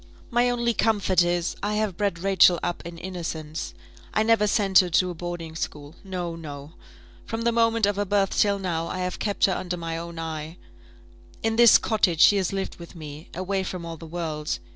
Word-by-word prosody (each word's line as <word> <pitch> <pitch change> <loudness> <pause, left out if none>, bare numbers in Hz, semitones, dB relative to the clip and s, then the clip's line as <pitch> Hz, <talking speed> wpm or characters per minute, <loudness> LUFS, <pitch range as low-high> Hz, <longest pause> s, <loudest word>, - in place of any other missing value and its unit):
"My 240 +1 +3
only 235 -1 +1
comfort 205 -5 +2
is, 175 0 0
I 210 +1 -1
have 210 -4 -1
bred 200 -2 -1
Rachel 185 -1 +5
up 175 - -2
in 170 0 -9
innocence; 165 -3 -5 0.4
I 215 - +3
never 220 -2 +3
sent 195 -2 +4
her 180 - +2
to 180 +2 +2
a - - -5
boarding 170 -1 -6
school. 150 -2 -5
No, 180 -3 -4
no; 145 -2 -9 0.5
from 225 0 -4
the 235 - +3
moment 230 -1 +3
of 205 0 0
her 205 - 0
birth 200 -1 +1
till 200 -1 +3
now, 170 -4 -2
I - - -4
have 180 0 -3
kept 205 -2 +1
her 190 - +1
under 180 0 -3
my 165 -1 -4
own 170 0 -8
eye. 160 0 -5 0.9
In 225 0 +1
this 235 -1 +8
cottage 190 -7 +1
she 205 - +7
has 190 -2 0
lived 195 -1 -4
with 170 0 -12
me, 155 -1 -9
away 190 +2 -1
from 185 -2 -5
all 165 -1 -6
the 165 - -10
world. 155 -2 -3
180 Hz, 205 wpm, -25 LUFS, 165-205 Hz, 0.9 s, this